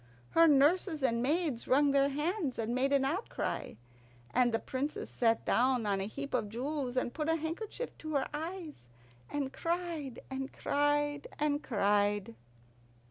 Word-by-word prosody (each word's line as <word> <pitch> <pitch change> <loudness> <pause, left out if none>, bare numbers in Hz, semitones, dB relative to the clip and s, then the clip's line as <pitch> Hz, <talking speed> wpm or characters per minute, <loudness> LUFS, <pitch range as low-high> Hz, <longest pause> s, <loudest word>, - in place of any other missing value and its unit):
Her 330 0 +6
nurses 305 +2 +3
and 235 -2 +2
maids 295 -2 0
wrung 280 +2 +4
their 275 0 +4
hands 300 - -1
and 230 +1 -1
made 265 +2 +1
an 275 -1 +3
outcry, 340 - -2 0.6
and 245 -1 +4
the 225 - +2
Princess 270 +5 -4
sat 230 -2 +2
down 250 -1 +2
on 200 -2 +1
a - - -1
heap 280 +7 -6
of 220 -5 0
jewels, 260 +2 -3
and 245 -1 0
put 310 0 -2
a 325 - +4
handkerchief 340 +9 -4
to 310 -1 -4
her 275 - +1
eyes, 320 - -6 0.4
and 280 -2 -2
cried 335 -6 -3
and 265 +1 -4
cried 290 0 0
and 295 0 +1
cried. 205 - +1
280 Hz, 155 wpm, -32 LUFS, 245-310 Hz, 0.6 s, Her